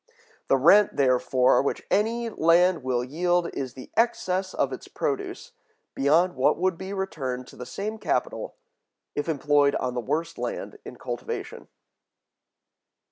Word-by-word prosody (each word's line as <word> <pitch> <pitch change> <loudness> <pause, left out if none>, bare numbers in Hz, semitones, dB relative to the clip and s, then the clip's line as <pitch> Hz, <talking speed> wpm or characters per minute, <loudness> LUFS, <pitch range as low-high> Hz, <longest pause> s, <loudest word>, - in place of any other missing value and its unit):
The 135 - +4
rent, 190 +9 +5
therefore, 130 -1 +3
which 140 - -3
any 230 +3 +1
land 170 0 +3
will 125 -1 -1
yield, 175 +6 0
is 130 -2 -5
the 130 - -11
excess 190 -5 +1
of - - 0
its - - -8
produce, 410 0 -4 0.4
beyond 160 +6 +3
what 130 - +2
would 185 +1 +1
be 190 +3 -7
returned 135 -10 -3
to - - -14
the 125 - -8
same 215 +10 -5
capital - - -2 0.6
if 145 +3 -3
employed 145 -1 +3
on 125 -1 -2
the 125 - -2
worst 165 +7 -3
land 120 0 -5
in - - -8
cultivation. - - -6
165 Hz, 140 wpm, -26 LUFS, 130-190 Hz, 0.6 s, rent